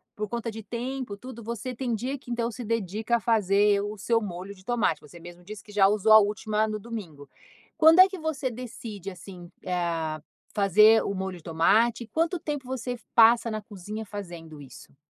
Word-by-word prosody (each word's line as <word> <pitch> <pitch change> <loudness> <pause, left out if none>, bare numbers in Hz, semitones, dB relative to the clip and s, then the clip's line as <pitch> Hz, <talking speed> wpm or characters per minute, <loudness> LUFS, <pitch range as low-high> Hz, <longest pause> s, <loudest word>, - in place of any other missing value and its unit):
por 210 0 -3
conta 235 +1 -4
de 225 - -8
tempo 240 0 -5
tudo 250 0 -10
você 235 +3 -5
tem 245 -1 -2
dia 260 +6 -3
que 250 - -16
então 235 0 -1
se 245 - -7
dedica 220 +1 -1
a - - -6
fazer 205 -2 +3
o 210 +1 -5
seu 230 +3 +1
molho 190 0 -6
de 185 - -19
tomate, 225 -10 0
você 160 +4 -14
mesmo 175 +1 -12
disse 205 +2 -9
que 210 - -15
já 200 -2 +5
usou 210 +1 +2
a 215 - +11
última 210 +1 0
no 215 - -3
domingo. 185 -11 -8 0.5
Quando 320 +2 +7
é 370 - +10
que 380 -1 -8
você 300 -5 -2
decide, 220 -5 -7
assim, 180 -1 -11 0.2
ah, 165 -4 -2 0.3
fazer 215 +3 +5
o - - -2
molho 190 -1 -4
de 160 - -16
tomate, 220 +8 +2
quanto 330 - 0
tempo 295 -4 -4
você 250 -1 -4 0.2
passa 230 +1 +6
na 215 0 -3
cozinha 210 +1 -8
fazendo 170 -6 -9
isso? 135 0 -14
215 Hz, 195 wpm, -26 LUFS, 190-235 Hz, 0.5 s, a